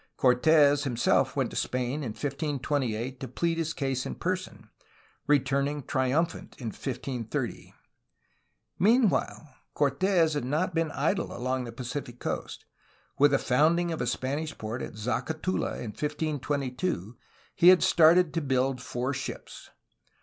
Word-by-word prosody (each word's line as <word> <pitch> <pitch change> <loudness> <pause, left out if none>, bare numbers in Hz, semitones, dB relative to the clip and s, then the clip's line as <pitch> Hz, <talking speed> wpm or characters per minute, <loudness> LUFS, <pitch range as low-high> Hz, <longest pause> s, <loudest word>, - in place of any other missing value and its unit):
Cortes 145 +3 +4
himself 120 -4 +1
went - - 0
to - - -9
Spain 125 +3 -1
in 120 -7 -4
1528 135 -3 -2
to 130 - -5
plead 165 +7 -1
his 160 -1 -1
case 135 -4 -2
in 65 - -5
person, - - -4 0.6
returning 140 0 +1
triumphant 135 +7 -1
in 120 -4 -4
1530. 125 +1 -4 1.0
Meanwhile, 200 - +2 0.2
Cortes 160 +3 +2
had 145 - -1
not 155 +8 -1
been 165 -1 0
idle 165 +8 -1
along 130 +1 -2
the 120 - -7
Pacific 125 +1 -6
coast. - - -5 0.5
With 145 +1 +7
the 140 - +3
founding 165 +7 +2
of 160 - -3
a 125 - -1
Spanish 140 +6 -2
port 110 +3 -5
at - - -6
Zacatula 135 - -2
in 110 - -5
1522, 145 - -2 0.4
he 175 - +4
had 185 0 +8
started 170 +1 +5
to 165 - 0
build 130 -2 0
four 125 +1 -3
ships. 135 - -7
140 Hz, 135 wpm, -28 LUFS, 125-160 Hz, 1.0 s, had